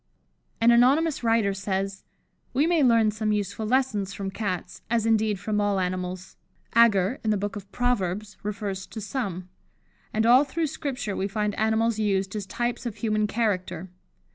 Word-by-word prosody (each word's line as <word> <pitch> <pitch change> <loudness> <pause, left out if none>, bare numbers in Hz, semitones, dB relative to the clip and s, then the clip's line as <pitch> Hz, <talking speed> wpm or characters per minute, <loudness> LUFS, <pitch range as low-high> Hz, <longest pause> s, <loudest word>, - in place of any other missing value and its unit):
'" - - -44
An 235 +1 +6
anonymous 275 +6 +4
writer 225 -3 +2
says: 195 0 -3 0.5
"We 285 +4 +4
may 335 -2 +3
learn 230 -4 +4
some 215 0 -1
useful 210 +1 -2
lessons 215 -6 0
from 195 -1 -4
Cats, 190 -3 -4
as 230 -1 +1
indeed, 220 -3 +2
from 210 +2 -1
all 205 -1 +1
animals. 185 0 -4 0.4
Agur, 230 -1 +4
in 220 - 0
the 210 - +2
book 205 +1 -3
of 200 -1 -9
Proverbs, 210 -4 -1
refers 200 -2 -4
to 225 - -8
some; 195 -6 -4 0.6
and 220 +1 +1
all 250 +4 +7
through 315 +4 -2
Scripture 275 -8 -3
we 195 - -1
find 210 0 -1
animals 220 +1 +1
used 195 -2 0
as 205 -2 -4
types 240 +4 -2
of 225 - -5
human 215 -2 0
character. 190 -5 -2
215 Hz, 165 wpm, -26 LUFS, 195-235 Hz, 0.6 s, all